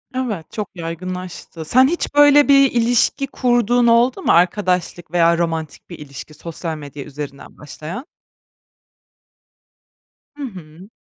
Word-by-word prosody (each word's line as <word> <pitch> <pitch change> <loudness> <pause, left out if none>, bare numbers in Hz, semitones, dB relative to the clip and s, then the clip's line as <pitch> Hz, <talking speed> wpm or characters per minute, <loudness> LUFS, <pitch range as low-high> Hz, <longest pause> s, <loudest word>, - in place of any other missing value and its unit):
Evet, 220 -11 -4
çok 210 -3 -5
yaygınlaştı. 175 0 -7
Sen 255 +10 +5
hiç 340 0 -2
böyle 290 0 +6
bir 275 -1 +5
ilişki 240 +3 +1
kurduğun 245 -2 +2
oldu 240 +8 +3
mu? - - +2
Arkadaşlık 180 -2 +1
veya 170 -1 +3
romantik 165 -2 -3
bir 170 - -9
ilişki, 145 +1 -10
sosyal 165 +1 -6
medya 145 -1 -9
üzerinden 140 -1 -9
başlayan. 155 - -8 2.3
Hı 290 - -6
hı. 180 - -10
180 Hz, 120 wpm, -19 LUFS, 160-245 Hz, 2.3 s, böyle